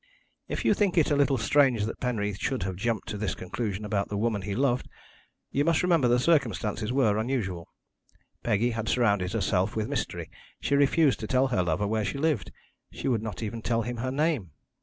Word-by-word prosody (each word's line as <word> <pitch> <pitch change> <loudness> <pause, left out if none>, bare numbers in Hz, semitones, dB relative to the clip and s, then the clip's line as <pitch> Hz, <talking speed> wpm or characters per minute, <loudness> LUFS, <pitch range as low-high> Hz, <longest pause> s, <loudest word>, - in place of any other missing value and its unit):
"If - - -3
you - - +5
think 200 -3 +1
it 155 -2 +4
a - - +4
little 140 -1 +3
strange 130 -1 +3
that 110 - -5
Penreath 105 -5 -2
should 130 -8 -1
have 95 0 -3
jumped 110 +2 -2
to 105 - -4
this 105 -2 -1
conclusion 105 +1 -4
about 100 -2 -1
the 105 - -3
woman 110 -1 0
he 100 +1 -4
loved, 125 -1 +1 0.6
you 140 - +1
must 165 +2 +2
remember 170 -8 +3
the 120 0 +4
circumstances 120 - +1
were 115 -6 +2
unusual. 105 -8 -2 0.7
Peggy 115 +2 +1
had 110 -1 -3
surrounded 100 -7 +2
herself 95 -2 0
with 110 -1 -1
mystery; - - -3 0.3
she - - -1
refused 140 0 +3
to 110 - -5
tell 130 +2 +2
her 120 -8 +1
lover 90 +3 0
where 110 +1 0
she 95 +6 -3
lived, 145 - 0 0.4
she - - -5
would 120 -4 +1
not 110 -1 -5
even 110 +1 -4
tell 115 0 0
him 120 +1 -4
her 130 +3 -2
name. 145 - 0
115 Hz, 200 wpm, -27 LUFS, 105-135 Hz, 0.7 s, you